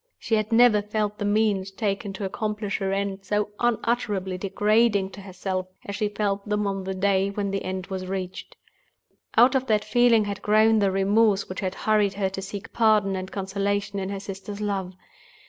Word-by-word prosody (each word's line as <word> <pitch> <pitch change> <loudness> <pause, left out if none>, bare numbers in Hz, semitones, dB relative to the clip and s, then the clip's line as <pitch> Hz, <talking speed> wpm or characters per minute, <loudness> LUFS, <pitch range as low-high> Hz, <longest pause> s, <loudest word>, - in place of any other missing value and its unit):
She - - -4
had 215 0 +1
never 225 -2 +6
felt 210 0 -2
the 205 - -1
means 205 -2 +1
taken 195 0 -2
to 195 +1 -4
accomplish 210 +1 -3
her 195 -1 -1
end 195 0 -2
so 210 +2 0
unutterably 225 -5 0
degrading 205 +1 +2
to 200 - -10
herself, 185 -1 -4 0.2
as 200 - -5
she 210 0 0
felt 205 -1 -2
them 210 0 0
on 195 -1 -2
the 190 0 -3
day 195 0 +2
when 200 0 -2
the 195 - -2
end 185 0 -4
was 190 -2 -5
reached. 185 -1 -5 0.8
Out 245 +4 +7
of 265 -1 0
that 210 -2 +2
feeling 240 -3 +4
had 200 -1 -4
grown 215 +1 +4
the 200 -1 +3
remorse 200 +2 +2
which 185 - -6
had 190 -1 -3
hurried 210 -2 +3
her 195 -1 -1
to 195 - -5
seek 200 +2 -7
pardon 215 -4 +3
and 185 0 -5
consolation 200 +1 -2
in 190 0 -3
her 200 -1 -4
sister's 200 +1 -7
love. 195 -3 -3
200 Hz, 190 wpm, -25 LUFS, 195-210 Hz, 0.8 s, Out